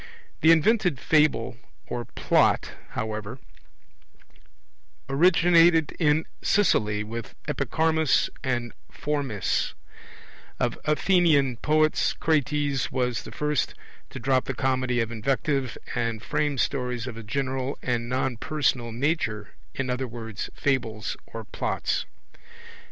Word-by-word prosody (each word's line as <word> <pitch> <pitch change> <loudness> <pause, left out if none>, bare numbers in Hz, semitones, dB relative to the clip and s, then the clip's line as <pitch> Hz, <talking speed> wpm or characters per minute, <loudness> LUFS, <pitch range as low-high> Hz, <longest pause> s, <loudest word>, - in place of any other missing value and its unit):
The 160 - +5
invented 175 - +3
Fable, 135 -7 +2 0.3
or 120 -1 -4
Plot, - - +2 0.3
however, 110 +2 -3 1.7
originated 165 0 +4
in 155 -1 +3 0.2
Sicily, 105 - +2
with 115 0 -7
Epicharmus 155 +2 +2 0.2
and 120 -3 -1 0.2
Phormis; 140 -9 -1 0.8
of - - -1
Athenian 150 -5 +3
poets 155 +3 +2
Crates 145 -3 0
was 125 -2 0
the - - -10
first 150 -2 -1 0.3
to 135 - -8
drop 130 +1 +1
the 135 - -3
Comedy 130 -1 +1
of 115 0 -2
invective 135 +3 -1 0.2
and 115 -2 -2
frame 145 -2 0
stories 125 -3 -1
of 125 -3 -6
a 115 - -7
general 130 +3 -2
and 120 -1 -1
non 130 -1 -1
personal 125 -3 0
nature, 115 - -1 0.3
in 130 -1 -2
other 130 +1 -2
words, 115 -3 -6
Fables 115 -6 -1
or 115 0 -7
Plots. - - -2
130 Hz, 110 wpm, -26 LUFS, 120-150 Hz, 1.7 s, The